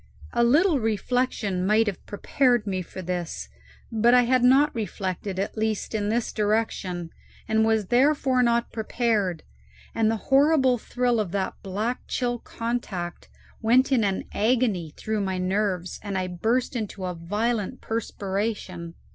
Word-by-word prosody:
A 235 Hz, -, +3 dB
little 300 Hz, +6 st, +4 dB
reflection 220 Hz, -3 st, 0 dB
might 215 Hz, +4 st, +3 dB
have 205 Hz, -4 st, -4 dB
prepared 240 Hz, +2 st, +1 dB
me 190 Hz, -2 st, -2 dB
for 185 Hz, +1 st, -8 dB
this, 170 Hz, -, -4 dB, 0.4 s
but 235 Hz, +2 st, +4 dB
I 250 Hz, -, +6 dB
had 250 Hz, +1 st, +2 dB
not 275 Hz, +4 st, +5 dB
reflected, 195 Hz, -3 st, -4 dB
at 195 Hz, +1 st, -2 dB
least 220 Hz, -1 st, -2 dB
in 210 Hz, -1 st, -1 dB
this 230 Hz, +1 st, -1 dB
direction, 205 Hz, -5 st, -1 dB, 0.4 s
and 220 Hz, 0 st, +2 dB
was 220 Hz, -3 st, +1 dB
therefore 265 Hz, 0 st, +3 dB
not 235 Hz, -1 st, +2 dB
prepared; 215 Hz, -5 st, -1 dB, 0.5 s
and 220 Hz, -1 st, +2 dB
the 225 Hz, -, +1 dB, 0.2 s
horrible 270 Hz, -3 st, +4 dB
thrill 245 Hz, 0 st, 0 dB
of 200 Hz, -5 st, -2 dB
that 195 Hz, -2 st, -1 dB
black 210 Hz, +6 st, -2 dB
chill 245 Hz, -1 st, -1 dB
contact 225 Hz, -9 st, -4 dB, 0.3 s
went 250 Hz, +5 st, +4 dB
in 245 Hz, -5 st, +3 dB
an 195 Hz, -2 st, 0 dB
agony 215 Hz, -8 st, +1 dB
through 215 Hz, -1 st, -2 dB
my 190 Hz, -1 st, -1 dB
nerves, 185 Hz, -1 st, -1 dB
and 200 Hz, -2 st, -3 dB
I 185 Hz, -, 0 dB
burst 225 Hz, +9 st, -1 dB
into 210 Hz, -4 st, -4 dB
a 180 Hz, -, -2 dB
violent 210 Hz, +7 st, -2 dB
perspiration. 195 Hz, -5 st, -3 dB
220 Hz, 145 wpm, -25 LUFS, 190-240 Hz, 0.5 s, I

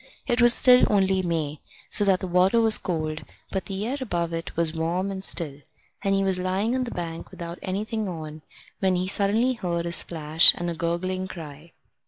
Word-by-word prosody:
It 240 Hz, -1 st, 0 dB
was 240 Hz, 0 st, +8 dB
still 250 Hz, +1 st, +5 dB
only 190 Hz, -2 st, +2 dB
May, 160 Hz, -4 st, -3 dB, 0.3 s
so 205 Hz, -, +5 dB
that 190 Hz, -2 st, +2 dB
the 185 Hz, -, -4 dB
water 180 Hz, +5 st, +2 dB
was 225 Hz, -1 st, +5 dB
cold, 155 Hz, -3 st, -4 dB, 0.3 s
but 190 Hz, -, -3 dB
the 195 Hz, +1 st, -4 dB
air 260 Hz, +5 st, -3 dB
above 170 Hz, -8 st, -3 dB
it 165 Hz, -1 st, -6 dB
was 165 Hz, -1 st, +2 dB
warm 170 Hz, +4 st, -2 dB
and 190 Hz, -1 st, -7 dB
still, 150 Hz, -7 st, -1 dB, 0.4 s
and 195 Hz, 0 st, +1 dB
he 195 Hz, -, +1 dB
was 190 Hz, -1 st, +2 dB
lying 190 Hz, +5 st, -1 dB
on 255 Hz, 0 st, -1 dB
the -, -, -6 dB
bank 165 Hz, -4 st, -6 dB
without 170 Hz, 0 st, -9 dB
anything 210 Hz, +2 st, -4 dB
on, 155 Hz, -2 st, -8 dB, 0.4 s
when 190 Hz, -1 st, +1 dB
he 180 Hz, +1 st, -2 dB
suddenly 210 Hz, +6 st, +2 dB
heard 170 Hz, -7 st, -3 dB
a 170 Hz, -, -3 dB
splash 160 Hz, -1 st, +5 dB
and 175 Hz, 0 st, -4 dB
a -, -, -6 dB
gurgling 185 Hz, +3 st, -3 dB
cry. 160 Hz, -2 st, -11 dB
185 Hz, 200 wpm, -24 LUFS, 165-200 Hz, 0.4 s, was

